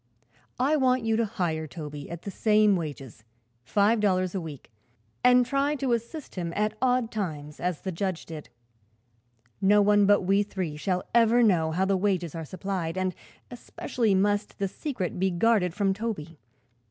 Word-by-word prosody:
I 285 +5 +3
want 255 -3 +2
you 225 0 +1
to 230 - +2
hire 170 -7 -2
Toby 150 -2 -8
at 170 0 -7
the 200 - -5
same 210 0 +3
wages 140 -9 -6 0.4
five 210 - +2
dollars 185 -3 +1
a 190 - -2
week 150 -7 -9 0.5
and 250 0 +6
try 275 +3 0
to 270 -4 0
assist 235 +6 -4
him 170 -3 -4
at 210 +1 0
odd 250 -2 +1
times 150 -8 -5
as 180 -3 -2
the 190 - -3
judge 185 0 -3
did. 155 -2 -9 1.1
No 205 +2 +5
one 205 0 +4
but 205 0 +5
we 195 +2 +2
three 185 -6 -4
shall 180 +4 -1
ever 235 +1 +5
know 175 -7 +3
how 180 +4 0
the 195 0 +2
wages 185 -4 0
are 165 -1 -5
supplied, 185 -1 -4
and 185 -1 0 0.4
especially 235 -3 -1
must 205 +2 0
the 200 - -1
secret 195 - -4
be 190 +1 +2
guarded 185 0 +2
from 200 -2 +1
Toby. 190 -7 -5
195 Hz, 170 wpm, -27 LUFS, 170-225 Hz, 1.1 s, and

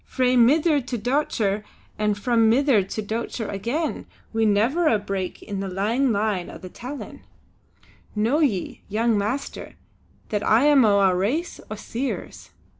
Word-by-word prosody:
Frae 255 -1 +1
mither 290 +5 +4
to 250 -1 -4
dochter, 220 -4 0 0.3
and 210 -1 0
from 230 +1 +3
mither 255 -2 +4
to 195 +3 -5
dochter 225 +1 -3
again, 235 - -3 0.3
wi' 225 0 +2
never 230 +11 +2
a 225 - +4
break 195 -2 -4
in 200 -2 -5
the 195 - -3
lang 220 +8 0
line 205 -4 -1
o' - - -9
the 185 - -10
tellin'. 255 +9 -8 0.9
Know 225 +8 +2
ye, 225 - 0
young 225 +2 +1
master, 215 +7 -3 0.5
that 210 -1 -1
I 225 +5 +4
am 290 -3 +6
o' 200 -1 +4
a 190 -2 +4
race 250 - -1
o' 215 - -4
Seers. 245 +5 -5
225 Hz, 155 wpm, -24 LUFS, 205-260 Hz, 0.9 s, am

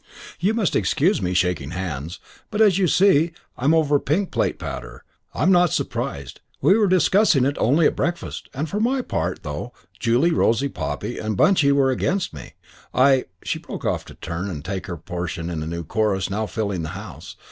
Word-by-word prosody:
"You 200 +6 +1
must 215 -6 0
excuse 165 - +2
me 90 0 -1
shaking 90 -6 0
hands, 85 -2 -5 0.3
but 210 - -3
as 200 -4 +5
you 185 - +3
see 170 -2 +4 0.2
I 125 - -5
am 155 +3 +5
over 150 -3 +3
pink 180 +9 -1
plate - - 0
powder. - - -7 0.3
I'm 175 +6 +3
not 175 -3 +4
surprised. 70 -2 -3 0.2
We 190 - +5
were 215 -2 +3
discussing 185 -5 +4
it 140 +1 0
only 150 +7 +3
at - - +3
breakfast; 170 +4 -3
and 145 +5 -3
for 205 - -3
my 255 +4 +1
part, 90 - -3
though 75 +10 -5 0.3
Julie, 125 +9 +2
Rosie, 135 -2 +2
Poppy 75 - -4
and 110 -2 -3
Bunchy 165 - +4
were 135 -1 +3
against 185 - -1
me, 70 -5 -10 0.4
I 130 0 +4
" 90 - -27
She - - -2
broke - - -8
off - - 0
to - - -12
turn 85 +4 -5
and 75 -6 -6
take 95 0 -4
her 85 -2 -5
portion 85 0 -5
in 80 -2 -3
a 80 - -4
new 85 +1 -4
chorus 100 +2 0
now 110 +2 -1
filling 100 -6 -2
the 80 - -4
house. - - -9
125 Hz, 200 wpm, -22 LUFS, -, 0.4 s, as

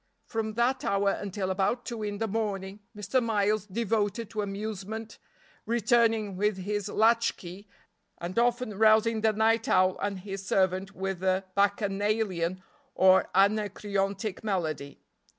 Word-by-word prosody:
From 220 -2 -3
that 240 +3 +1
hour 200 0 +2
until 195 -1 -3
about 195 +6 0
two 235 -3 -5
in 205 -1 -3
the 225 +1 -1
morning 200 -2 -3 0.2
Mr. 210 +6 0
Miles 210 -2 0
devoted 220 +1 -1
to 215 - -2
amusement, 210 +2 -5 0.5
returning 225 -3 +2
with 205 +1 0
his 205 +1 -3
latch 230 +2 +3
key, 185 +3 -10 0.5
and 175 +6 -3
often 240 -3 0
rousing 220 0 +4
the 220 0 +3
night 225 +3 +2
owl 185 0 +3
and 200 -2 -2
his 195 0 -6
servant 190 +1 0
with 190 -1 -3
a 190 0 +1
bacchanalian 200 -3 0 0.3
or 190 0 +5
Anacreontic 200 0 0
melody. 160 -9 -3
205 Hz, 135 wpm, -28 LUFS, 195-220 Hz, 0.5 s, or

